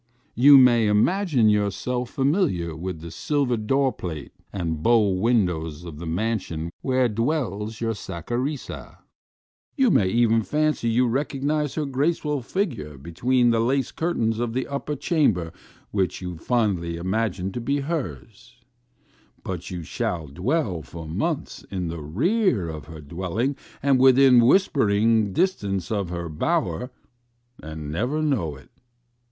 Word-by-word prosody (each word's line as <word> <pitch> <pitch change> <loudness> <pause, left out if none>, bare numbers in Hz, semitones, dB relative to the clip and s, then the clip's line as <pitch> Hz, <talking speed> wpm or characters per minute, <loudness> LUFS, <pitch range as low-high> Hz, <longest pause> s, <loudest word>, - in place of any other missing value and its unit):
You 140 +3 +8
may 120 -4 +6
imagine 135 - +3
yourself 105 +5 0
familiar 135 - 0
with 85 0 -5
the 85 0 -8
silver 140 - 0
door 130 +5 +1
plate 80 -6 -6 0.2
and 80 -5 -3
bow 110 +1 +4
windows 90 -6 0
of 80 -3 -8
the 85 - -6
mansion 85 -3 -2
where 130 -1 +2
dwells 115 -3 -2
your 115 -1 -1
Saccharissa; 120 - -5 0.8
you 265 -5 +4
may 95 - +4
even 115 +2 +3
fancy 150 -1 0
you 125 +2 +3
recognize 145 +3 -1
her 155 - -1
graceful 145 +1 0
figure 120 - -3
between 120 - +1
the 115 - +2
lace 130 +2 +1
cur 170 +2 -2
tains 115 0 0
of 120 -1 -2
the 130 +1 -1
upper 140 +1 -4
chamber 130 - +1 0.4
which 95 -3 -1
you 90 -1 -5
fondly 90 -4 0
imagine 95 +1 -1
to 120 - -5
be 140 +4 0
hers; 125 -5 -6 0.9
but 90 -2 -5
you 90 -2 -5
shall 80 +1 -3
dwell 90 - -1
for 80 +4 -9
months 80 - -3
in 90 -3 -3
the 85 -1 -5
rear 130 - +1
of 80 -3 -6
her 80 0 -10
dwelling 95 - -2 0.3
and 140 -2 +4
within 130 -1 +6
whispering 110 - +3
distance 100 - -1
of 100 -5 -1
her 85 -1 -4
bower, 80 +7 -1 0.7
and 80 -1 -7
never 125 - -1
know 105 - 0
it. 65 -2 -17
115 Hz, 140 wpm, -24 LUFS, 90-135 Hz, 0.9 s, You